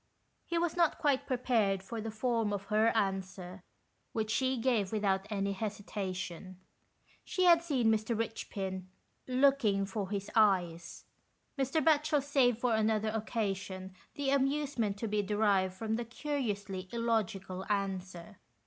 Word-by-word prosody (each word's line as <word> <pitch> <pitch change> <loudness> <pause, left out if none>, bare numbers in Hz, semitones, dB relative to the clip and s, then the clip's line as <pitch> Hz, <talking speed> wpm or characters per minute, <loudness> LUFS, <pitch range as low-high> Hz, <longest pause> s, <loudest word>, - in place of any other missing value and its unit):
He 340 - -1
was 340 0 0
not 340 -2 +3
quite 285 -5 +1
prepared 230 -7 +1
for 225 +2 -5
the 225 - -4
form 225 -1 0
of 200 -1 -2
her 215 +1 +4
answer, 190 -2 -2 0.5
which 220 -1 -1
she 260 +2 +1
gave 225 -5 +1
without 200 -2 0
any 200 -2 -1
hesita 200 -2 -4
tion. 185 0 -6 0.7
She 370 - -1
had 340 -2 +7
seen 260 -9 +2
Mr. 220 +1 0
Eichpin 195 -4 -4 0.4
"looking 255 -7 +3
for 195 -1 -4
his 200 -1 -3
eyes." 180 -6 +2 0.5
Mr. 275 +3 0
Batchel 300 -2 +3
saved 265 -5 +3
for 240 0 +1
another 220 0 +1
occa 220 -2 -1
sion 190 -1 -8 0.2
the 280 -1 0
amusement 275 -6 +1
to 225 - -3
be 210 0 +1
derived 200 -2 +1
from 220 +2 -2
the 240 - -3
curiously 210 -8 -3
illogical 205 -5 -1
answer. 190 -1 -3
215 Hz, 140 wpm, -32 LUFS, 195-250 Hz, 0.7 s, had